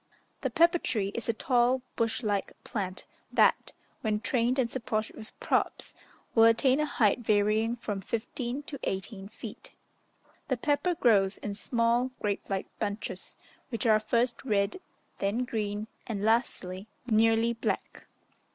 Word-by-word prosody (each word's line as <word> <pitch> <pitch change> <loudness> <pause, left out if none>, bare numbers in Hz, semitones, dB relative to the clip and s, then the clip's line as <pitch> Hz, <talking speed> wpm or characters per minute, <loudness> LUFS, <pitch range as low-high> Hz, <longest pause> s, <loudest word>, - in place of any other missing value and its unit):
The - - 0
pepper 340 +1 +4
tree 205 -9 0
is 235 - -3
a - - +3
tall 245 +2 +2
bush 230 +2 0
like 205 -2 -1
plant, 190 -5 -3 0.3
that, - - +3 0.3
when 215 -1 0
trained 245 +2 +1
and 255 -3 +3
supported 225 -3 -3
with 215 - -12
props, - - 0 0.4
will 225 -1 +7
attain 255 +4 +4
a 300 - +1
height 220 -6 +2
varying 215 +1 +2
from 210 -4 -4
fifteen 240 +6 -3
to 280 -1 -7
eighteen 195 +1 -3
feet. 215 - -10 0.7
The 260 - 0
pepper 295 +7 +1
grows 210 - +4
in 205 - -4
small, 235 +4 +1
grape 205 -1 -2
like 195 -1 -1
bunches, 200 -2 -4 0.3
which 235 -1 -3
are 215 -2 +5
first 235 +2 0
red, 210 - 0 0.4
then 210 +6 0
green, 210 -2 -2 0.2
and 205 -4 -3
lastly, 205 -4 0 0.2
nearly 225 0 +3
black. 230 - -3
225 Hz, 140 wpm, -29 LUFS, 205-245 Hz, 0.7 s, will